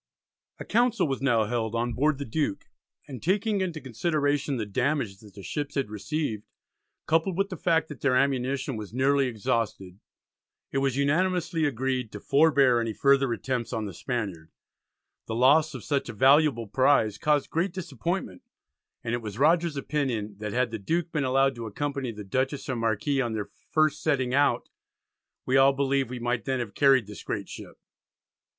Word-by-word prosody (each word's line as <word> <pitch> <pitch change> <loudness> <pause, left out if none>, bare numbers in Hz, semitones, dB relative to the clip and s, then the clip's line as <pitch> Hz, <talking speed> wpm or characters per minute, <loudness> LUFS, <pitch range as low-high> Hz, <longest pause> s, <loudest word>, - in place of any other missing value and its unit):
A - - -8
Council 240 -3 +2
was 135 -2 -3
now 120 -5 +3
held 115 0 -2
on 120 +1 -1
board 150 +3 +1
the 140 - -5
Duke, 140 -3 -2 0.4
and 130 -4 -8
taking 200 +3 +1
into 175 -4 -2
consideration 145 +1 -1
the 110 - -2
damage 120 -1 -1
that 105 -3 -16
the 100 - -10
ships 145 +5 -4
had 135 -7 -1
received, 110 0 -3 0.6
coupled 165 +3 +1
with 195 0 +1
the 185 - -5
fact 165 -1 +1
that 150 - -9
their 135 -2 +2
ammunition 135 0 0
was 105 +1 -8
nearly 135 +1 +3
exhausted, 105 -4 -2 0.7
it 135 - 0
was 135 -1 0
unanimously 165 +3 +1
agreed 130 -3 -1
"to 105 - -6
forbear 140 -3 +4
any 115 -1 -2
further 140 +1 +3
attempts" 120 0 -2
on 110 -1 -2
the 100 - -6
Spaniard. 95 -8 -4 0.8
The 110 - -3
loss 145 +6 +4
of - - -7
such 140 -2 -1
a - - -5
valuable 135 +1 +4
prize 110 -2 +2
caused 150 -2 +1
great 170 +4 0
disappointment, 170 - -4 0.6
and 115 - -2
it 120 - -1
was 105 -2 -7
Rogers's 165 +2 +3
opinion, 125 -8 -2
that 105 -1 -4
had 125 0 0
the 110 - -4
Duke 165 - -1
been 150 -4 0
allowed 135 +1 +3
to 115 -1 -5
accompany 140 +2 -3
the 105 -1 -8
Dutchess 130 +7 -2
and 125 -3 -2
Marquis 115 +5 0
on 120 -3 -2
their 105 -2 -4 0.2
first 155 -1 +2
setting 130 -5 0
out 145 +1 +2 0.8
"we 130 +1 +2
all 135 +1 +6
believe 135 -2 0
we 125 - -5
might 120 -1 -2
then 130 -1 0
have 115 -4 -4
carried 135 -5 +4
this 105 0 -10
great - - -4
ship." - - -10
135 Hz, 180 wpm, -27 LUFS, 115-150 Hz, 0.8 s, all